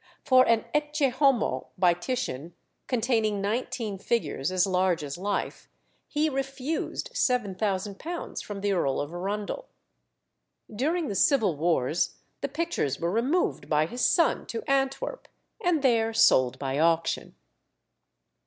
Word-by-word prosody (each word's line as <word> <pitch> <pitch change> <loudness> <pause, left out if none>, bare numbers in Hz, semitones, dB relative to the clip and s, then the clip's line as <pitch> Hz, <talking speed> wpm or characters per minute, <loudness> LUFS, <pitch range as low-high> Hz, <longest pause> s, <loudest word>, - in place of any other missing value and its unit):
For 255 -2 +5
an 230 -1 +3
"Ecce 295 -1 +1
Homo" 250 - +2
by 180 -1 +5
Titian, 175 - -4 0.3
containing 225 -4 +1
nineteen 210 -1 -2
figures 185 - -1
as 185 0 +3
large 185 -3 +1
as 140 -1 -5
life, 200 +3 -3 0.4
he 300 +1 +1
refused 270 +1 -3
£7000 210 - -1
from 205 -2 -6
the 205 0 +1
Earl 140 -7 0
of 145 +3 -4
Arundel. 205 - -4 1.1
During 310 +7 0
the - - -3
Civil 210 - +3
Wars 160 0 +1 0.3
the - - -2
pictures 330 - -1
were 170 +1 -1
removed 235 - 0
by 150 0 +3
his 245 +10 -5
son 335 -2 +3
to 230 - -4
Antwerp, 270 - -1 0.4
and 340 -5 +2
there 225 -3 +3
sold 130 - +4
by 135 +1 -2
auction. 165 0 +1
215 Hz, 125 wpm, -27 LUFS, 175-270 Hz, 1.1 s, For